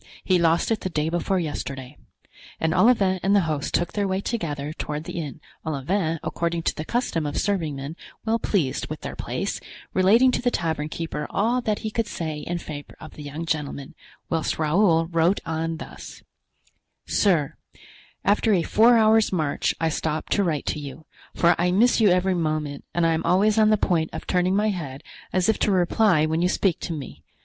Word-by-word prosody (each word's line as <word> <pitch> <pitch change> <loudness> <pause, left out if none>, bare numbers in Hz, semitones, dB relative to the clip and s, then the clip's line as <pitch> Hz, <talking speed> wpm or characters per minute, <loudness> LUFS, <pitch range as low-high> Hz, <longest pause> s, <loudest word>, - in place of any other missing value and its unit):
he 185 -2 +3
lost 170 +4 +2
it 220 - +1
the 185 - -2
day 155 -2 -1
before 175 +3 0
yesterday." 140 -5 -4 0.6
And 160 0 +1
Olivain 195 -6 +4
and 195 +2 +3
the 200 - +5
host 155 -4 -2
took 175 - 0
their 205 -1 0
way 190 0 0
together 155 -9 -3
toward 150 -1 -4
the 170 - -5
inn, 150 -2 -6 0.2
Olivain, 160 +3 -1
according 170 -1 -2
to - - 0
the 155 - -4
custom 165 -7 -1
of 145 - -4
serving 170 -8 0
men 140 +4 -6 0.3
well 225 +1 +1
pleased 160 -14 0
with - - -6
their - - -6
place, - - -3 0.3
relating 225 +8 +5
to - - -1
the 245 - +2
tavern 160 -7 -2
keeper 160 -2 -4
all 235 +5 +1
that 215 -3 -1
he 215 - -2
could 230 0 -1
say 155 -3 -4
in 175 +3 -3
favor 150 -3 -8
of - - -11
the - - -10
young 150 +3 -6
gentleman; 150 -4 -3 0.3
whilst 165 -2 -1
Raoul 165 +1 +3
wrote 165 +3 +2
on 165 0 -2
thus: - - -10 0.8
"Sir,—After 200 - -1
a 170 - +1
four 230 +7 +5
hours' 220 0 +4
march 155 -6 0
I 165 - +1
stop 155 0 -2
to 205 - +2
write 160 -5 -1
to 150 - -2
you, 145 +2 -9 0.3
for 170 0 +4
I 175 +1 +2
miss 225 +6 +3
you 210 - +6
every 185 +1 +2
moment, 155 -4 -2
and 175 -1 +2
I 165 - +3
am 160 - 0
always 210 +4 +3
on 215 0 +5
the 215 - +4
point 165 -5 +1
of - - -6
turning 180 +1 +1
my 210 +2 +2
head 150 -8 -5 0.3
as 185 -1 +1
if 220 - +2
to 210 - +2
reply 180 -2 +3
when 160 +1 0
you 180 - +2
speak 185 -2 +1
to - - -5
me. 135 - -8
170 Hz, 195 wpm, -24 LUFS, 155-200 Hz, 0.8 s, you